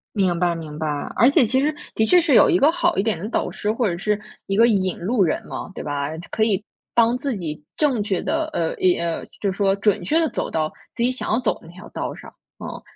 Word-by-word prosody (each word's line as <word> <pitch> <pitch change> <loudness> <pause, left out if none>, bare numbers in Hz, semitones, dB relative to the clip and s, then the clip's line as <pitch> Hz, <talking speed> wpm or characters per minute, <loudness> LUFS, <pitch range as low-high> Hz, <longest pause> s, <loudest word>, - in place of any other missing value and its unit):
明 185 -4 +1
白 175 -1 +2
明 155 -2 -8
白， 155 - -2 0.3
而 240 +4 +5
且 290 -2 +4
其 260 +4 +2
实 300 +2 +1 0.2
的 220 - +2
确 355 +11 +6
是 325 -6 +2
有 - - +7
一 355 - +4
个 290 - +5
好 345 0 +1
一 - - +2
点 220 -5 0
的 200 +6 -5
导 - - -1
师， 210 - -3
或 230 0 +1
者 170 - -2
是 210 +2 -1 0.3
一 195 - -1
个 230 +2 +6
引 190 -5 +1
路 205 +4 +1
人 160 - 0
嘛， - - -6
对 - - -6
吧， 145 -1 -2 0.2
可 220 - 0
以 210 -2 +2 0.3
帮 235 +1 +4
自 275 -4 -2
己 155 -4 -5
正 270 -8 +2
确 200 -3 -1
地 320 +1 0
呃 165 - 0
呃 - - -5 0.5
呃， - - -9 0.2
就 200 - 0
是 - - -10
说 195 -1 +2
准 200 0 +1
确 315 - +2
地 325 -1 +2
走 - - -3
到 155 -1 -1 0.2
自 235 - -1
己 255 - +2
想 255 - -5
要 220 - +3
走 250 -3 +1
的 - - -16
那 170 - -13
条 185 +4 -12
道 - - -4
上， - - -12 0.3
嗯。 - - -7
210 Hz, 280 characters per minute, -22 LUFS, 180-255 Hz, 0.5 s, 有